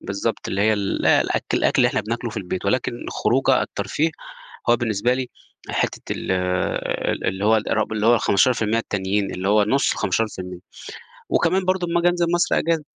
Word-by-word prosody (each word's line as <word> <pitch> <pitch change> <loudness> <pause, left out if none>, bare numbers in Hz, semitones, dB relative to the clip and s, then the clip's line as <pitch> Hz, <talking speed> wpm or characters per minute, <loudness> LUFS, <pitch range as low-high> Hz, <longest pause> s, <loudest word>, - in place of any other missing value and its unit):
بالضبط، 100 +4 -3
اللي 100 - -2
هي 110 +1 +4
ال 100 -2 -1
الأكل - - +2
الأكل - - +1
اللي - - +5
إحنا - - -1
بناكله 115 +2 -4
في 110 - -10
البيت 95 -1 -4
ولكن 120 +4 0
الخروجة - - +1
الترفيه 160 +2 -1 0.6
هو 120 - +5
بالنسبة 120 +1 0
لي 130 -1 -3 0.4
حتّة - - -1
ال - - -3 0.8
ال - - -3
اللي 95 +1 -1
هو 110 +1 +5
ارب 110 0 -1
اللي 110 0 0
هو 120 - +6
ال15% 115 +1 +2
التانيين 100 -2 -1
اللي 95 +1 -2
هو 105 0 +4
نص 135 +7 +2
ال15%. 95 -2 -2 0.7
وكمان 185 +3 +2
برضه 185 -1 0
أما 170 0 +1
آجي 175 - +4
أنزل 175 -1 +1
مصر 175 - +2
أجازة. 165 -2 0
110 Hz, 175 wpm, -22 LUFS, 100-130 Hz, 0.8 s, هو